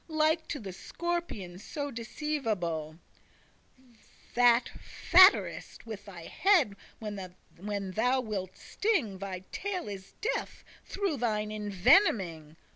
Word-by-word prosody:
Like 315 Hz, 0 st, +1 dB
to 290 Hz, -, -4 dB
the 195 Hz, -5 st, -7 dB
scorpion 275 Hz, -, -4 dB
so 285 Hz, +6 st, -5 dB
deceivable,* 220 Hz, -, -3 dB, 0.8 s
*deceitful 250 Hz, -3 st, -26 dB
That 245 Hz, 0 st, +4 dB, 0.4 s
fhatt'rest 370 Hz, -, +5 dB
with 210 Hz, -3 st, -8 dB
thy 180 Hz, -4 st, -10 dB
head 340 Hz, -, +3 dB, 0.2 s
when 200 Hz, -1 st, -6 dB
thou 250 Hz, +7 st, +2 dB
wilt 195 Hz, -5 st, -5 dB
sting; 290 Hz, -, -1 dB
Thy 190 Hz, -2 st, -5 dB
tail 390 Hz, -, -3 dB
is 195 Hz, -2 st, -8 dB
death, -, -, -3 dB, 0.2 s
through 390 Hz, -7 st, -2 dB
thine 215 Hz, -3 st, -1 dB
envenoming. 200 Hz, -, +2 dB
220 Hz, 110 wpm, -30 LUFS, 190-305 Hz, 0.8 s, fhatt'rest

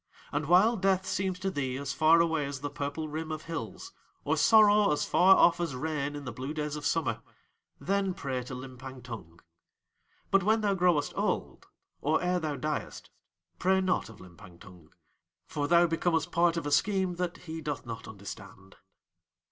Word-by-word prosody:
And 145 Hz, 0 st, -2 dB
while 200 Hz, +7 st, +5 dB
Death 190 Hz, -1 st, +1 dB
seems 190 Hz, -1 st, -1 dB
to 190 Hz, 0 st, -1 dB
thee 130 Hz, -5 st, -2 dB
as 140 Hz, -1 st, -4 dB
far 160 Hz, +3 st, +5 dB
away 160 Hz, -4 st, 0 dB
as 140 Hz, -1 st, -6 dB
the 145 Hz, 0 st, -4 dB
purple 145 Hz, +2 st, -4 dB
rim 155 Hz, +1 st, -5 dB
of 155 Hz, 0 st, -5 dB
hills; 165 Hz, -, -6 dB, 0.3 s
or -, -, +1 dB
sorrow 210 Hz, -3 st, +5 dB
as 150 Hz, -, 0 dB
far 190 Hz, +2 st, +6 dB
off 170 Hz, -, +4 dB
as 170 Hz, -6 st, -2 dB
rain 145 Hz, 0 st, -3 dB
in 145 Hz, -1 st, -7 dB
the 125 Hz, -, -4 dB
blue 130 Hz, +6 st, -6 dB
days 150 Hz, -1 st, -3 dB
of 150 Hz, -1 st, -2 dB
summer, 115 Hz, -9 st, -1 dB, 0.6 s
then 195 Hz, -1 st, 0 dB
pray 130 Hz, -6 st, -3 dB
to 130 Hz, -, -7 dB
Limpang 130 Hz, 0 st, -9 dB
Tung. 95 Hz, -9 st, -9 dB, 0.9 s
But 195 Hz, -, +5 dB
when 220 Hz, +4 st, +2 dB
thou 205 Hz, -2 st, +1 dB
growest 175 Hz, -6 st, +2 dB
old, -, -, -2 dB, 0.3 s
or 155 Hz, +2 st, +2 dB
ere 180 Hz, 0 st, 0 dB
thou 155 Hz, -3 st, -3 dB
diest, 150 Hz, +1 st, -4 dB, 0.5 s
pray 190 Hz, +1 st, +3 dB
not 185 Hz, -10 st, 0 dB
of 110 Hz, -, -14 dB
Limpang 90 Hz, -1 st, -14 dB
Tung, 90 Hz, -6 st, -15 dB, 0.6 s
for 145 Hz, -1 st, -3 dB
thou 170 Hz, +1 st, +5 dB
becomest 165 Hz, 0 st, 0 dB
part 170 Hz, 0 st, +2 dB
of 165 Hz, -, -3 dB
a 145 Hz, -, -2 dB
scheme 190 Hz, +1 st, +1 dB
that 180 Hz, -1 st, -2 dB
he 160 Hz, -1 st, -6 dB
doth 145 Hz, -3 st, -4 dB
not 115 Hz, -1 st, -7 dB
understand. 100 Hz, -2 st, -11 dB
155 Hz, 180 wpm, -29 LUFS, 140-180 Hz, 0.9 s, far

